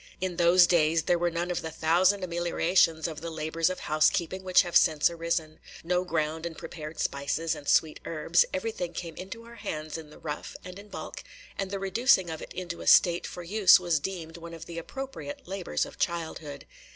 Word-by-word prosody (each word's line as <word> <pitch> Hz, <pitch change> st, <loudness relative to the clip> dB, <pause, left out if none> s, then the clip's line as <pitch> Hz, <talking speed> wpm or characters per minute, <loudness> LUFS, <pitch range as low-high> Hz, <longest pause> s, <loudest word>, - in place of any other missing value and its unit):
In 185 Hz, -2 st, -3 dB
those 175 Hz, +1 st, +6 dB
days 165 Hz, -2 st, +3 dB
there 175 Hz, -, +2 dB
were 175 Hz, 0 st, +2 dB
none 170 Hz, +1 st, -2 dB
of 175 Hz, -, -2 dB
the 160 Hz, -, -5 dB
thousand 175 Hz, +5 st, +2 dB
ameliorations 170 Hz, -1 st, +2 dB
of 160 Hz, -2 st, -7 dB
the 165 Hz, -, -4 dB
labors 160 Hz, +1 st, -1 dB
of 185 Hz, -, -5 dB
housekeeping 170 Hz, +4 st, +1 dB
which 185 Hz, -1 st, +5 dB
have 175 Hz, -1 st, -6 dB
since 155 Hz, +1 st, +5 dB
arisen, 165 Hz, -2 st, -2 dB
– -, -, -14 dB
no 180 Hz, +2 st, +1 dB
ground 160 Hz, -2 st, -2 dB
and 170 Hz, -2 st, -5 dB
prepared 155 Hz, -1 st, -8 dB
spices 145 Hz, +4 st, -1 dB
and 145 Hz, -, -6 dB
sweet 155 Hz, -2 st, +3 dB
herbs; 165 Hz, +2 st, +2 dB
everything 185 Hz, -3 st, -3 dB
came 165 Hz, -1 st, -6 dB
into 195 Hz, +5 st, -8 dB
our 235 Hz, 0 st, -13 dB
hands 155 Hz, -3 st, -5 dB
in 155 Hz, -2 st, -11 dB
the 150 Hz, -, -14 dB
rough, 150 Hz, -1 st, -6 dB
and 180 Hz, +1 st, -9 dB
in 205 Hz, -, -12 dB
bulk, -, -, -8 dB, 0.3 s
and 195 Hz, -1 st, -3 dB
the 200 Hz, -, -3 dB
reducing 195 Hz, -2 st, +2 dB
of 160 Hz, -, -6 dB
it -, -, -9 dB
into 175 Hz, -2 st, -6 dB
a -, -, -8 dB
state 175 Hz, -1 st, +5 dB
for 175 Hz, -, -8 dB
use 195 Hz, +1 st, +6 dB
was 175 Hz, -4 st, +1 dB
deemed 165 Hz, -1 st, -6 dB
one 170 Hz, 0 st, -9 dB
of 165 Hz, 0 st, -9 dB
the 170 Hz, -1 st, -6 dB
appropriate 270 Hz, -, -7 dB
labors 190 Hz, -1 st, -2 dB
of -, -, -13 dB
childhood. 160 Hz, -4 st, -3 dB
170 Hz, 205 wpm, -28 LUFS, 160-185 Hz, 0.3 s, those